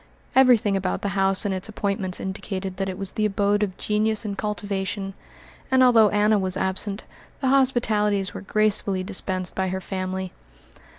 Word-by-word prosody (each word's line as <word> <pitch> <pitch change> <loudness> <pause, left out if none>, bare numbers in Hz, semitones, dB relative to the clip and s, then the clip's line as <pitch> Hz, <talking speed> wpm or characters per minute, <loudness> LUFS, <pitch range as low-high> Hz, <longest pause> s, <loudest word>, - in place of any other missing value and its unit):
Everything 245 -6 +5
about 190 -1 -2
the 200 - 0
house 195 0 +2
and 200 - 0
its 190 +3 -4
appointments 200 -3 -2
indicated 190 -1 -5
that 195 0 -2
it 185 - -5
was 195 -1 -2
the 215 - -1
abode 205 0 +1
of 195 -3 -2
genius 215 +1 0
and 200 -1 -3
cultivation, 200 -1 -3 0.6
and, 260 -1 +5
although 230 -4 +6
Anna 210 +1 +3
was 185 -1 -1
absent, 195 +2 -2 0.4
the 265 - 0
hospitalities 215 -7 +2
were - - -6
gracefully 200 -2 +1
dispensed 185 -2 -3
by 190 0 -1
her 190 +1 -2
family. 185 0 -4
200 Hz, 165 wpm, -24 LUFS, 190-215 Hz, 0.6 s, although